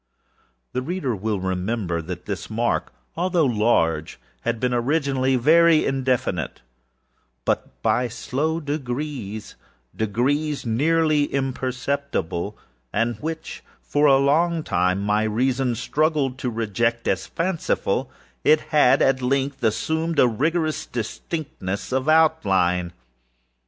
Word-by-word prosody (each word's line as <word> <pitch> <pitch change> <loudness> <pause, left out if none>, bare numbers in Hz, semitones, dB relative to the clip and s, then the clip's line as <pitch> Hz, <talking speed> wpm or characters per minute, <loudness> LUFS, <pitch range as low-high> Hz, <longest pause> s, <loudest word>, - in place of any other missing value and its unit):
The 125 - -1
reader 140 -4 -2
will 105 +1 -2
remember 95 -1 -2
that 90 +2 -7
this 100 -3 -5
mark, 115 +2 -1 0.2
although 175 -1 +2
large, 105 - +1 0.2
had 120 -1 -1
been 125 +1 0
originally 135 +1 +1
very 160 +5 +5
indefinite; 130 -2 -1 0.8
but, - - -2
by 125 0 +2
slow 150 +7 -2
degreesâdegrees 125 - -3
nearly 150 +5 +2
imperceptible, 130 - -2 0.3
and 115 +1 0
which 160 +4 -6 0.2
for 145 +1 +2
a 135 -1 +6
long 160 +4 +2
time 90 -1 +1
my 105 +1 +2
reason 125 +3 +1
struggled 145 +1 0
to 125 - -1
reject 115 +1 -1
as - - -1
fancifulâit 165 -2 0
had, 140 -4 +5
at 130 -1 +2
length, 135 +1 -1
assumed 160 +8 0
a 130 - +6
rigorous 155 +7 0
distinctness 115 - -4
of 130 +3 0
outline. 95 - +3
130 Hz, 105 wpm, -23 LUFS, 110-150 Hz, 0.8 s, a